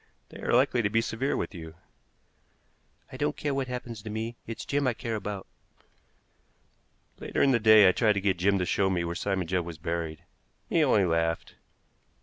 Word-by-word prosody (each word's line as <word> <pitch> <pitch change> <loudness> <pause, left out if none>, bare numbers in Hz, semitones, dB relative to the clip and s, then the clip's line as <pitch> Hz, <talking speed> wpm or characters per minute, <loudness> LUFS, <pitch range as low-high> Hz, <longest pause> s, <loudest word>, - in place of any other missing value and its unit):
They - - -11
are - - -2
likely 125 0 +3
to 100 - 0
be 115 - +2
severe 115 +4 -1
with - - -3
you." 80 -3 -9 1.4
"I - - -8
don't 75 - -1
care 145 -1 -2
what 135 -1 -1
happens 120 -3 -6
to 110 - -8
me; 110 +2 -4
it's 115 -1 -6
Jim 140 -1 0
I 120 - +1
care 115 -1 -4
about." 105 -2 -5 1.7
Later - - -1
in 140 - +4
the 120 - +3
day 110 -2 +7
I - - +7
tried 105 +2 +2
to 100 - -1
get 95 -2 +1
Jim 100 +2 +3
to 90 - 0
show 95 +2 +1
me 90 -2 0
where 85 0 -3
Simon 95 0 -1
Judd 90 +1 0
was 85 -1 -8
buried. 80 0 -4 0.4
He 165 - +2
only 105 -9 +4
laughed. 80 -1 -1
105 Hz, 195 wpm, -28 LUFS, 90-115 Hz, 1.7 s, day